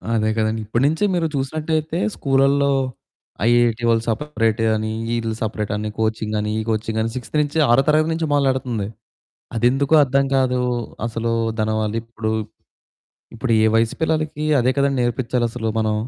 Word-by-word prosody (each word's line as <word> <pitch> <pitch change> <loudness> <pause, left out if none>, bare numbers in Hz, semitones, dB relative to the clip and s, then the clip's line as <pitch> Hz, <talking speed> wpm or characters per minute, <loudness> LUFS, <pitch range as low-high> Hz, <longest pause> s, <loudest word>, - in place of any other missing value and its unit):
అదే 110 0 +1
కదండి. 110 0 0
ఇప్పడు 115 +4 0
నుంచే 160 +7 +1
మీరు 165 -2 +1
చూసినట్టయితే 155 +4 -2 0.2
స్కూళ్ళల్లో 140 +1 +2 0.8
ఐఐటీ 120 -1 +3
వాళ్ళు 115 0 +2
సపరేట్ 115 -3 0
అని, 110 0 -2 0.2
ఈళ్ళు 115 -1 -2
సపరేట్ 105 -1 -2
అని 105 0 -3
కోచింగ్ 110 -1 -1
అని 105 0 -2
ఈ - - 0
కోచింగ్ 110 0 -1
అని 115 +1 -1
సిక్స్‌త్ 130 +4 -4
నుంచి 150 +2 -1
ఆరో 130 +3 +5
తరగతి 155 +1 +3
నుంచి 160 -1 -2
మొదలెడుతంది. 130 -7 0 0.7
అదెందుకో 135 +6 +2
అర్థం 135 +1 +1
కాదు. 130 -1 +2 0.5
అసలు 115 0 -2 0.3
దాని 110 0 0
వాళ్ళు 110 +1 -1
ఇప్పుడు 115 -1 -4 1.0
ఇప్పుడు 115 0 -1
ఏ - - +5
వయసు 115 0 +2
పిల్లలకి 155 -1 -1 0.2
అదే 130 +2 +2
కదండి 140 -1 +2
నేర్పిచ్చాలసలు 120 -1 -1
మనం. 110 -1 +1
120 Hz, 150 wpm, -21 LUFS, 110-140 Hz, 1.0 s, ఆరో